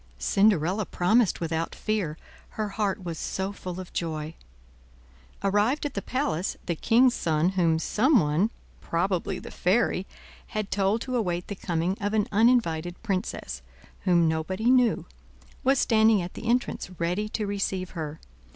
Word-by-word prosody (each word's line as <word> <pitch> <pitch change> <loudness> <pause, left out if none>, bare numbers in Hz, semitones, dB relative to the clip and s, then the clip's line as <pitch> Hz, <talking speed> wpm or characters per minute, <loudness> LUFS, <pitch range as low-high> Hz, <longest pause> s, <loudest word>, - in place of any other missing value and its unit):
Cinderella 195 - +2
promised 215 +4 +2
without 165 0 -2
fear, 195 -8 -2 0.4
her 215 -1 -1
heart 200 -2 -1
was 170 -3 -5
so 190 +1 -2
full 185 -2 -7
of 185 - -9
joy. 155 -2 -3 1.1
Arrived 210 +10 +2
at 290 - -2
the 200 - -2
palace, 255 - -2
the 175 - 0
king's 245 +8 +4
son, 160 -2 +1
whom 170 -4 +2
some 245 - +3
one, 155 +6 +2 0.3
probably 185 +2 -1
the - - -9
fairy, 190 0 +1 0.4
had 215 -3 -4
told 200 +3 +1
to 255 - -3
await 180 -6 -1
the 205 - -3
coming 175 +2 -1
of 205 +2 0
an 210 -2 +2
uninvited 195 -7 +2
princess, 185 - -3 0.4
whom 175 -3 +4
nobody 185 +9 0
knew, 250 -4 +3 0.6
was 270 +1 +4
standing 220 -3 +4
at 175 0 -5
the 230 - -7
entrance, 240 -6 0
ready 180 +5 -1
to 215 0 -2
receive 195 -2 -2
her. 160 -3 -5
195 Hz, 150 wpm, -27 LUFS, 170-220 Hz, 1.1 s, king's